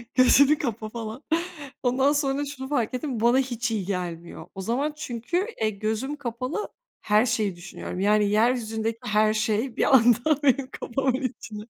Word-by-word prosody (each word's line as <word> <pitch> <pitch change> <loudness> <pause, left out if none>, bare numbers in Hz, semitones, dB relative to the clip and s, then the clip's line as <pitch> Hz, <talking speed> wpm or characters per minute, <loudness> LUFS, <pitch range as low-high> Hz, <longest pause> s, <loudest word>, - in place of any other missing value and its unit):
Gözünü 280 +3 +6
kapa 225 -5 -3
falan. 230 +3 -7 0.6
Ondan 265 +3 +3
sonra 280 -1 0 0.2
şunu 265 - -6
fark 245 -7 0
ettim, 255 -3 -3
bu - - -6
bana 240 +2 +5
hiç 245 -2 -2
iyi 205 -4 -2
gelmiyor 175 -3 -5
o 190 - -5
zaman 265 +9 -1
çünkü, 305 - -2
eee, 215 - +3
gözüm 220 +7 -3
kapalı 255 - -4 0.3
her 215 +3 +3
şeyi 215 -5 0
düşünüyorum. 175 +1 -7
Yani 205 +1 +3
yeryüzündeki 225 0 +1
her 215 -1 +3
şey 220 +3 -1
bir 270 - +4
anda 250 +5 +4
benim 270 -1 +2
kafamın 265 +1 -1
içinde. 220 -4 -5
235 Hz, 160 wpm, -25 LUFS, 215-265 Hz, 0.6 s, Gözünü